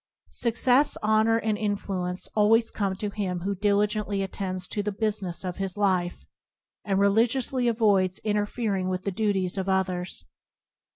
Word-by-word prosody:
Success, 250 +4 +3
honour, 220 +1 +3
and 220 -2 -1
influence 195 -4 -3
always 225 +2 +3
come 195 -2 -1
to 205 +1 -4
him 185 -4 -3
who 200 +3 -1
diligently 205 0 0
attends 185 -1 -4
to 210 - -2
the 210 +1 -2
business 205 -4 -2
of 180 -1 -4
his 195 0 -3
life, 185 -3 0 0.6
and 195 -2 0
religiously 235 +5 +2
avoids 205 -5 +2
interfering 205 -2 -1
with 185 0 -3
the 200 - -1
duties 195 -2 0
of 190 0 -2
others. 185 - -1
200 Hz, 140 wpm, -26 LUFS, 185-215 Hz, 0.6 s, Success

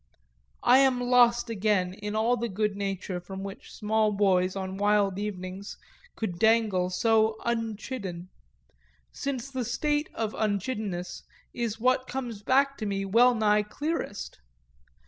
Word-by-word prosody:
I 255 +2 +6
am 265 -2 +4
lost 240 -1 +4
again 200 -4 +1
in 210 +2 -5
all 225 +3 +2
the 235 0 -3
goodnature 200 -2 -2
from 190 +2 -7
which 195 0 -9
small 215 0 +1
boys, 190 -2 +2
on 190 0 -4
wild 205 -1 +2
evenings, 195 -1 -5 0.4
could 185 -6 -4
dangle 220 -5 +3
so 220 +3 +2
unchidden 220 -5 -3 0.8
since 275 -1 -4
the 260 -2 -2
state 295 +5 -1
of 220 -1 -2
unchiddenness 205 -3 -2 0.3
is 230 -2 -3
what 255 +2 +2
comes 245 -5 -5
back 275 +5 +2
to 215 - -2
me 195 -1 -2
well 240 +5 +5
nigh 210 -1 +3
clearest. 210 - -4
215 Hz, 130 wpm, -27 LUFS, 195-240 Hz, 0.8 s, I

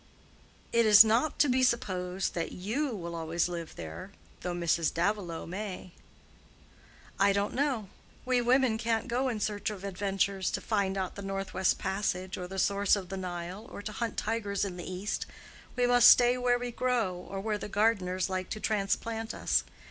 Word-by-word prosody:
"It 230 -1 +4
is 210 0 +10
not 235 +7 +2
to 295 - +4
be 260 0 +2
supposed 190 -7 0
that 165 -1 -3
you 225 +11 -2
will 175 -7 -5
always 165 +1 -1
live 170 -2 -6
there, 80 - -7 0.3
though 180 -1 -3
Mrs. 170 -1 +1
Davilow 175 -2 -1
may." 185 0 -6 1.3
"I 200 +1 +5
don't 200 +1 0
know. 260 -6 0 0.4
We 250 -1 +2
women 245 -2 +3
can't 225 +1 0
go 255 +2 0
in 225 -3 -3
search 210 0 -1
of 200 -3 -7
adventures—to 195 0 -1
find 200 -3 -1
out 190 -1 -2
the 200 - -8
North 195 0 -4
West 190 - +2
Passage 190 -1 -2
or 180 - -6
the 190 +1 -7
source 200 +1 +3
of 190 -3 -6
the 195 - -4
Nile, 180 +3 -6
or 205 - -8
to 215 - -4
hunt 230 +1 -3
tigers 210 -3 -1
in 190 -2 -5
the 180 +1 -7
East. 190 +3 -3 0.5
We 245 - +2
must 245 0 +7
stay 245 0 +6
where 245 -1 +2
we 245 0 -4
grow, 240 -6 0
or 180 +2 -7
where 210 +1 -2
the - - -6
gardeners 195 -4 +1
like 185 -1 -3
to 215 - -4
transplant 220 +2 -1
us. - - +1
200 Hz, 180 wpm, -30 LUFS, 185-230 Hz, 1.3 s, is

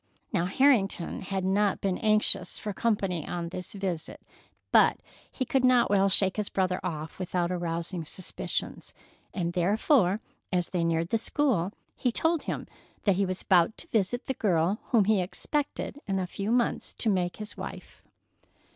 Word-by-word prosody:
Now 175 -4 +2
Harrington 205 -6 +2
had 190 0 -3
not 200 +1 +2
been 190 -2 -1
anxious 215 -4 +3
for 210 - -4
company 195 -7 0
on 170 -1 -3
this 180 0 -6
visit, 190 -5 -4 0.5
but - - +5 0.3
he 260 - -2
could 265 +1 +1
not 250 -4 +4
well 195 -1 +4
shake 195 0 +2
his 210 -2 -1
brother 185 -1 0
off 160 -2 -5
without 180 -1 -1
arousing 170 0 -3
suspicions, 185 +3 -4 0.4
therefore 185 - +2 0.3
as 180 -2 0
they 180 -2 0
neared 165 0 0
the 225 - +1
school 230 - +1 0.2
he 245 - 0
told 325 +5 +1
him - - -4 0.4
that 200 -3 +3
he 200 -1 +2
was 185 0 -4
about 180 +1 +4
to - - -6
visit 225 +3 0
the 265 - -1
girl 190 -3 +1
whom 220 -5 +3
he 210 -2 +3
expected 285 - -3
in 195 -1 0
a 185 - 0
few 200 +4 -3
months 240 0 0
to - - -2
make 180 -4 +1
his 210 0 -7
wife. - - -8
195 Hz, 165 wpm, -28 LUFS, 175-215 Hz, 0.5 s, but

